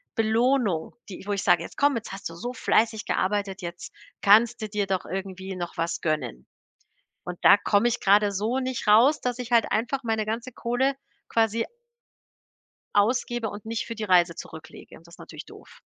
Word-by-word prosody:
Belohnung, 225 -5 +1
die 190 - -9
wo 205 - 0
ich 200 - -2
sage: 175 -1 +4
„Jetzt - - -10
komm, 285 -1 +3
jetzt 225 - -7
hast 195 -2 -6
du 165 - -11
so 245 +9 -5
fleißig 225 -2 +1
gearbeitet, 195 0 -1
jetzt 170 0 -8 0.3
kannst 220 +4 +5
du 215 - -4
dir 205 -1 -2
doch 190 -2 -1
irgendwie 190 +1 -6
noch 175 -1 -5
was 165 0 -2
gönnen.“ 150 - -3 0.8
Und 180 0 -6
da 200 - +8
komme 205 +3 +2
ich 240 - -2
grade 205 +1 +4
so 215 +6 -1
nicht 255 -3 -4
raus, 240 +8 +5
dass 245 -1 -2
ich 245 -1 -6
halt 235 -2 +3
einfach 245 +5 -1
meine 220 -2 -1
ganze 230 +4 -4
Kohle 255 +4 0 0.3
quasi 225 0 +1 1.3
ausgebe 235 +2 +1
und 205 +1 -10
nicht 225 0 -3
für 230 - -6
die 220 - -5
Reise 175 -3 +3
zurücklege 160 -1 -11
und 165 - -19
das 170 - -16
natürlich - - -10
doof. - - -16
210 Hz, 185 wpm, -25 LUFS, 190-235 Hz, 1.3 s, da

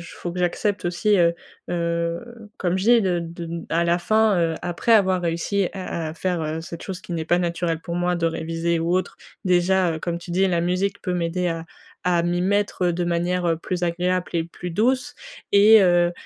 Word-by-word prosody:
faut 175 - -5
que 180 - -8
j'accepte 180 +2 -1
aussi, 195 +4 +2
heu 170 -1 +4 0.4
heu, 170 +7 -3
comme 180 0 0
je 190 - -2
dis 235 0 +6
de 180 -3 +1
de, 170 0 -6
à 170 +1 +2
la 170 0 +2
fin, 215 +1 +2
heu, 165 -1 +1
après 175 +6 -1
avoir 190 -4 +4
réussi 175 +3 0
à 170 -4 -4
à - - -7
faire, 175 0 -2
heu, 155 +1 -3
cette 170 0 -8
chose 185 -2 -6
qui - - -10
n'est 160 -1 -3
pas 175 +2 +2
naturelle 170 -1 -1
pour 170 +1 -5
moi, 175 0 0
de 170 -1 +1
réviser 165 +1 -1
ou 170 +2 +1
autre. 185 - -2 0.3
Déjà, 180 -1 +2
heu, 160 - -6
comme 170 0 -3
tu 175 - -12
dis 185 +3 +2
la 175 -2 +1
musique 185 +3 -1
peut 180 - -2
m'aider 175 +1 -1
à 165 -1 -3 0.4
à 175 -1 +2
m'y 175 +1 0
mettre, 200 0 0
heu, 175 - +2
de 175 +1 -1
manière, 175 +1 0
heu, 165 -1 +1
plus 180 +2 -4
agréable 180 +1 0
et 165 -1 +1
plus 175 +1 -8
douce, 255 +9 0 0.4
et 210 +2 +7
heu, 175 -2 +4
175 Hz, 215 wpm, -23 LUFS, 170-185 Hz, 0.4 s, et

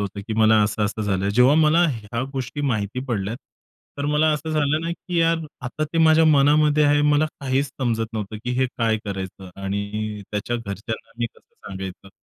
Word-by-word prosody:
होतं, 100 0 -4
की - - -1
मला 110 -1 +5
असं-असं 105 +1 -1
झालंय. 100 -1 0
जेव्हा 125 +6 +5
मला 165 +3 +4
ह्या 115 +1 -4
गोष्टी 135 +2 -4
माहिती 115 -4 -1
पडल्यात, 110 -3 -2 0.6
तर 140 - -2
मला 150 +1 +3
असं 150 +1 -3
झालं 150 0 +1
ना, 165 +1 -3
की 175 +1 -4
यार 165 0 +3 0.3
आता 155 +5 -2
ते 160 +2 -3
माझ्या 160 0 +6
मनामध्ये 150 0 +4
आहे. 145 0 +4
मला 150 +1 +3
काहीच 135 +1 0
समजत 115 -4 -2
नव्हतं, 110 -1 -4
की 125 - -2
हे 130 - +3
काय 115 -2 +2
करायचं 95 -2 -6
आणि 100 +2 -3
त्याच्या 105 +3 -2
घरच्यांना 110 +1 -6
मी 120 - 0
कसं - - -26
सांगायचं. 95 0 -7
120 Hz, 180 wpm, -23 LUFS, 105-150 Hz, 0.6 s, माझ्या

